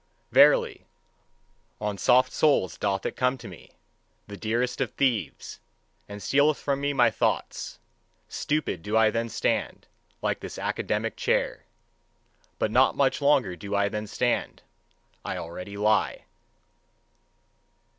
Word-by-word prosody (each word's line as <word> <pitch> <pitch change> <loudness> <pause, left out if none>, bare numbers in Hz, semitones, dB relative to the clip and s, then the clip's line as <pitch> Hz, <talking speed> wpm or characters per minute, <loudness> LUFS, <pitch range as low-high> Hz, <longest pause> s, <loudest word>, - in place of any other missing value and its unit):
Verily, 470 -5 +4 0.9
on 105 -1 -2
soft 125 +6 +3
soles 140 - +2
doth 100 -1 -2
it - - -3
come 125 +1 +1
to 120 - -10
me, 90 -3 -12 0.6
the 100 - -9
dearest 120 +5 -1
of 130 - 0
thieves, 115 - -1 0.5
and 100 0 -8
stealeth 145 +2 +3
from 140 -1 -2
me 145 0 0
my 120 -4 +4
thoughts: - - -2 0.5
stupid 145 - -2
do 105 +5 -1
I 110 -1 +5
then 115 +1 -2
stand, - - -2 0.4
like - - 0
this - - -8
academic - - -2
chair. - - 0 0.9
But 105 - -1
not 130 +3 +4
much 140 +1 +2
longer 140 -10 +3
do 100 +4 -5
I 100 0 +2
then 105 +1 -4
stand: 120 +3 -1 0.6
I - - -4
already 90 +4 -7
lie. 105 +1 +1
115 Hz, 130 wpm, -26 LUFS, 100-135 Hz, 0.9 s, I